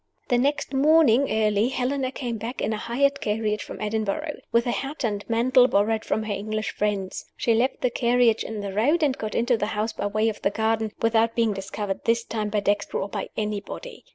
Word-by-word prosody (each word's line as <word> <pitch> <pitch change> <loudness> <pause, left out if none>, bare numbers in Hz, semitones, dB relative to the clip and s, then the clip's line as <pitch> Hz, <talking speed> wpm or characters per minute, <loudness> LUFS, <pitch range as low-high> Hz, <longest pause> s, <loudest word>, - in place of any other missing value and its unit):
The 245 - +3
next 285 +2 0
morning, 280 -2 +4
early, 215 0 +2
Helena 260 0 -1
came 240 -4 -4
back 235 +4 -5
in 220 - 0
a - - -2
hired 275 +6 0
carriage 210 0 -1
from - - -8
Edinburgh, 220 +8 -2
with 235 0 +3
a 240 - 0
hat 275 +4 -4
and 205 -3 -1
mantle 245 +2 +4
borrowed 220 0 +1
from 220 - 0
her 215 -1 -2
English 215 +1 -3
friends. 200 -3 -2
She 230 - +2
left 240 +4 +1
the 250 - +1
carriage 240 -2 +3
in 220 -2 -5
the 200 -1 -5
road, 290 - +2
and 275 -3 +2
got 215 -5 -5
into 240 +1 +2
the 210 - -1
house 220 +1 -1
by - - -2
way 215 +2 +1
of 220 - -3
the - - +2
garden 220 +1 0
without 230 0 +3
being 230 -3 +2
discovered, 195 0 -4
this 230 0 +2
time, 215 -2 -3
by 210 0 0
Dexter 200 0 0
or 195 - -3
by - - -4
anybody. 210 - -5
225 Hz, 210 wpm, -25 LUFS, 210-250 Hz, -, morning